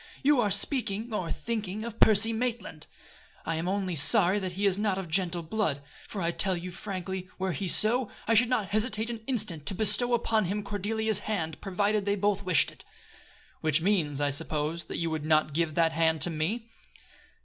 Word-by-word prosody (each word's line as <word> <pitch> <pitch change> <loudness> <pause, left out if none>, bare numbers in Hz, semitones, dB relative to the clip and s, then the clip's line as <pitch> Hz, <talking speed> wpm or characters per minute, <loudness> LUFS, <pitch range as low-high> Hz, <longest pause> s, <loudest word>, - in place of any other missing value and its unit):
You 280 -2 +4
are 210 - +1
speaking, 220 +1 -1
or 175 -6 -3
thinking, 215 +4 -4
of 230 -1 -8
Percy 220 +1 +6
Maitland. 225 -9 -4 0.6
I 165 - -2
am 165 +2 -3
only 190 -1 -2
sorry 175 +6 +5
that 185 -2 -4
he 200 +3 -2
is 195 0 +2
not 205 -3 0
of 190 -2 -5
gentle 175 0 0
blood; 160 -6 -2 0.2
for 195 -4 -5
I 170 - +1
tell 185 +1 -1
you 180 +1 -7
frankly, 190 -1 -6
were 190 0 -2
he 185 +4 -4
so, 225 +6 +4 0.2
I 225 - +3
should 230 +2 +4
not 220 -6 -1
hesitate 215 +2 -1
an 230 -2 -7
instant 205 - -1
to 190 - -1
bestow 220 +4 +2
upon 220 -3 0
him 205 +4 -3
Cordelia's 215 +1 -1
hand, 160 -9 -4
provided 205 +2 -1
they 200 0 +1
both 205 0 0
wished 180 -5 +3
it." - - -18 0.8
"Which 155 0 +1
means, 165 -8 0
I 145 -1 +1
suppose, 155 +2 -3
that - - -6
you 165 -1 -2
would 155 -2 -3
not 155 -1 +1
give 160 -1 -1
that 165 -1 +3
hand 160 -1 +1
to 175 - +4
me?" 175 +10 -2
195 Hz, 195 wpm, -28 LUFS, 165-215 Hz, 0.8 s, Percy